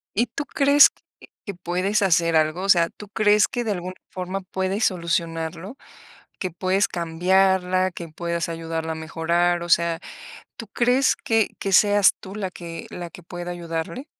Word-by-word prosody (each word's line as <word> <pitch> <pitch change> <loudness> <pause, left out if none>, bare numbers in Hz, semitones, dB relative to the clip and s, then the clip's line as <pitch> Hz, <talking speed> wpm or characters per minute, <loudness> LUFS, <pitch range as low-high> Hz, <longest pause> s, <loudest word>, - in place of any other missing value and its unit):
¿Y 235 +4 +2
tú 280 +5 -5
crees 285 +1 +6
que - - -34 0.4
que 200 - -5
puedes 185 +4 -1
hacer 170 -3 +2
algo? 155 +3 +1
O 195 - -3
sea, 170 -3 +5
¿tú 210 -1 -13
crees 210 0 +3
que 245 -2 -3
de 215 - -1
alguna 185 -1 -4 0.2
forma 185 +1 -4
puedes 190 +3 -2
solucionarlo? 170 +2 -2 0.7
¿Que 185 - -2
puedes 185 +4 0
cambiarla, 185 +2 +1
que 170 -1 -8
puedas 170 +2 -3
ayudarla 165 -1 -4
a - - -4
mejorar? 170 +2 0
O 175 - -6
sea, 170 -1 +2 0.6
¿tú 225 - -8
crees 250 +4 +2
que 225 -2 +1
que 195 -1 -2
seas 205 -1 +5
tú, 190 - -10
la 195 -3 -3
que 170 -2 -9
la 175 -1 -7
que 180 - -12
pueda 175 +1 -6
ayudarle? 170 - -5
180 Hz, 170 wpm, -23 LUFS, 170-200 Hz, 0.7 s, crees